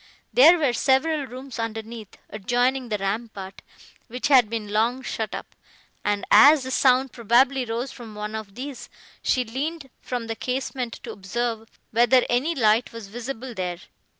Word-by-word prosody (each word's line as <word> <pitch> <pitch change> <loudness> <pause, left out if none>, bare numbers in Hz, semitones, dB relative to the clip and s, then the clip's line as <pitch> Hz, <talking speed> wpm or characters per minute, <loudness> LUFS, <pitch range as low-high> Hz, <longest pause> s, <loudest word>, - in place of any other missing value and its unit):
There 320 +7 +8
were 285 -7 +1
several 280 +3 +1
rooms 255 0 -9
underneath, 225 -1 -6
adjoining 245 +4 0
the 210 - 0
rampart, 195 -1 -5 0.5
which 250 +3 -3
had 255 -6 +6
been 220 -2 -4
long 235 +5 +1
shut 220 -4 -4
up, - - -9 0.5
and, 205 -1 -1
as 280 +7 +8
the 260 - -5
sound 260 0 +3
probably 245 +3 +2
rose 235 +3 -3
from 225 -4 -11
one 210 +1 -5
of 215 -3 -7
these, 270 +1 -7 0.3
she 250 -1 +1
leaned 275 +4 -4
from 245 -2 -4
the 225 0 -4
casement 250 0 -3
to - - -6
observe, 225 +3 -4 0.2
whether 240 +2 +4
any 275 +8 +1
light 225 -1 +2
was 230 -4 -9
visible 245 +2 -6
there. 180 -4 -4
240 Hz, 155 wpm, -24 LUFS, 220-260 Hz, 0.5 s, There